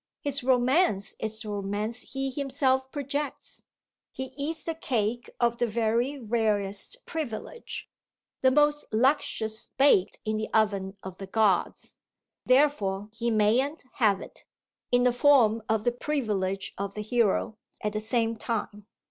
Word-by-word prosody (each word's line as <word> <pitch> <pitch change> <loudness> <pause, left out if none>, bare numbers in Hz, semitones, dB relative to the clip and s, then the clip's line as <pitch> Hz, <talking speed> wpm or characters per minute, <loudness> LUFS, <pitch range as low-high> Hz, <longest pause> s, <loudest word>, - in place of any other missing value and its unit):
His 280 -2 0
romance 250 - +2
is 220 0 -3
the 215 - -6
romance 205 +3 -2
he 270 0 -2
himself 265 -1 0
projects; 285 0 -4 0.5
he 265 0 -6
eats 310 +3 -3
the 330 - -2
cake 240 -7 -2
of 235 -1 +2
the 240 - +1
very 235 +5 0
rarest 210 -4 -1
privilege, 315 - -5 0.5
the 260 - +6
most 295 +2 +3
luscious 220 -2 +1
baked 265 -9 +4
in 215 0 0
the 215 - -3
oven 200 -3 +1
of 185 -1 -8
the 195 - -6
gods 200 -3 0 0.5
therefore 215 -8 +2
he 235 +1 -1
mayn't 235 +8 +2
"have" 205 -5 +3
it, - - -11 0.5
in 245 0 +4
the 250 -1 +4
form 245 -4 +4
of 220 -1 +1
the 245 - +2
privilege 210 -8 -2
of 200 0 -4
the 210 - -3
hero, 220 -1 +1 0.2
at 210 0 -2
the 215 - -1
same 225 +1 0
time. 210 -2 -4
230 Hz, 140 wpm, -27 LUFS, 210-265 Hz, 0.5 s, the